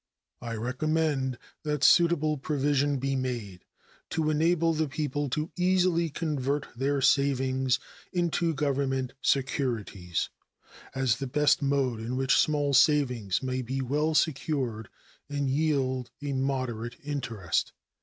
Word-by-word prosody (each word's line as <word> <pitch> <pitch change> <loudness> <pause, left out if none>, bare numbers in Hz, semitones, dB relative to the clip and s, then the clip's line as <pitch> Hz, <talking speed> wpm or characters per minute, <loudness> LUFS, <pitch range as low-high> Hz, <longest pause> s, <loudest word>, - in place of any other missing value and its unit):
I 115 -1 -4
recommended 135 +2 0 0.2
that 150 -2 -2
suitable 165 -3 +5
provision 145 0 +1
be 135 +1 -1
made 120 -8 -4 0.4
to 155 -1 0
enable 165 +2 +2
the 155 0 0
people 145 0 -2
to 150 +5 -2
easily 180 -2 +2
convert 145 -2 -2
their 135 +2 0
savings 130 -1 +2 0.3
into 170 -2 0
Government 135 -2 -1
securities, 115 - -1 0.7
as 130 -4 +2
the 135 - -4
best 150 +5 +3
mode 135 -4 +1
in 115 +3 -4
which 135 0 +3
small 145 -2 +2
savings 125 - +3
may 130 0 -1
be 130 +2 -3
well 150 +5 0
secured 130 -8 0 0.4
and 145 -2 -1
yield 135 -4 0
a 145 -1 -3
moderate 130 -4 -2
interest. 120 - -2
135 Hz, 120 wpm, -28 LUFS, 130-150 Hz, 0.7 s, suitable